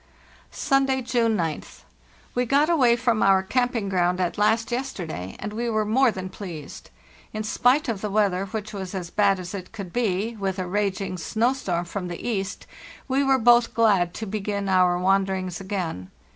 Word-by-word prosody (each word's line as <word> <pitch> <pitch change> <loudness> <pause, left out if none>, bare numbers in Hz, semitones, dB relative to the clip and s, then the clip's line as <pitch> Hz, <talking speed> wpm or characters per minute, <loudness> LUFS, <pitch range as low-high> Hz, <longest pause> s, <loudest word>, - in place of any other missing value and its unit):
"Sunday, 270 -1 +1
June 230 -2 +1
9th. 165 -4 -4 0.5
We 245 - +1
got 290 +6 +3
away 250 -8 +4
from 235 -2 +1
our 190 -1 +4
campine 245 0 0
ground 180 -1 +1
at 180 -2 0
last 225 +3 +1
yesterday, 180 - -4
and 210 +1 -6
we 235 +2 -2
were 215 -1 0
more 250 +5 +4
than 185 -3 -4
pleased. 175 -6 -9 0.4
In 215 0 -3
spite 250 +6 +2
of 220 -5 -2
the 210 - -2
weather, 195 -2 +1
which 215 +1 -5
was 190 -1 -5
as 175 -2 -5
bad 200 -2 +3
as 180 +1 -7
it 185 -2 -7
could 200 -6 -8
be, 225 -1 0
with 195 -2 -2
a 185 - -2
raging 195 -1 -2
snow 230 +9 +1
storm 180 -10 -2
from 180 +1 -5
the 175 +5 -6
east, 195 -4 -3 0.4
we 275 +1 +1
were 270 -1 +4
both 240 -1 +4
glad 200 -7 +3
to 220 - -4
begin 200 -1 -3
our 180 -2 +3
wanderings 190 -1 0
again. 180 - -4
200 Hz, 180 wpm, -24 LUFS, 185-235 Hz, 0.5 s, away